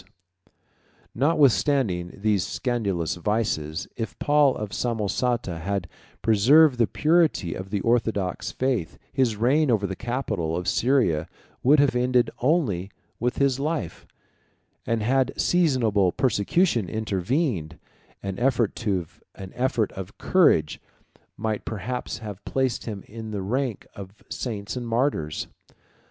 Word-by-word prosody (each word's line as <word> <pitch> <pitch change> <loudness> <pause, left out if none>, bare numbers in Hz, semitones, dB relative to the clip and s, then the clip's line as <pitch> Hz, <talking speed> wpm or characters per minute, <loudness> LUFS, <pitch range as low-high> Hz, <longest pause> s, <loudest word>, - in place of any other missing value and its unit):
] - - -36
Notwithstanding 135 - +2
these 105 -4 +2
scandalous 100 -10 -1
vices, 85 -5 -1
if 115 - -5
Paul 145 -2 +3
of 105 -2 -5
Samosata 115 -4 -1
had 95 +1 -2 0.4
preserved 125 +6 +5
the 115 - +4
purity 155 - +2
of 95 +1 -7
the 100 0 -1
orthodox 110 -5 0
faith, 125 -10 -1 0.2
his 130 -5 +2
reign 135 +7 +2
over 110 -4 +2
the 95 -1 -3
capital 105 -10 -2
of 90 - -4
Syria 115 - +2 0.3
would 145 +4 +5
have 140 -3 +3
ended 125 0 +2
only 120 - +1 0.3
with 120 +2 -1
his 135 -2 +2
life; 145 - -3 0.8
and 115 -2 0
had 130 +3 +2
a - - -12
seasonable 120 - +2
persecution 120 - +1
intervened, 105 - -1 0.5
an 95 -1 -4
effort 120 -4 +1 0.5
of 105 -2 -3
courage 80 - +3 0.6
might 110 0 -2
perhaps 120 +4 -4
have 105 -3 -8
placed 130 -3 -1
him 105 -4 -5
in 110 0 -8
the 100 -3 -4
rank 125 +2 -2
of 100 +1 -11
saints 110 -3 -4
and 125 -1 -4
martyrs. 115 - 0
115 Hz, 120 wpm, -25 LUFS, 95-130 Hz, 0.8 s, preserved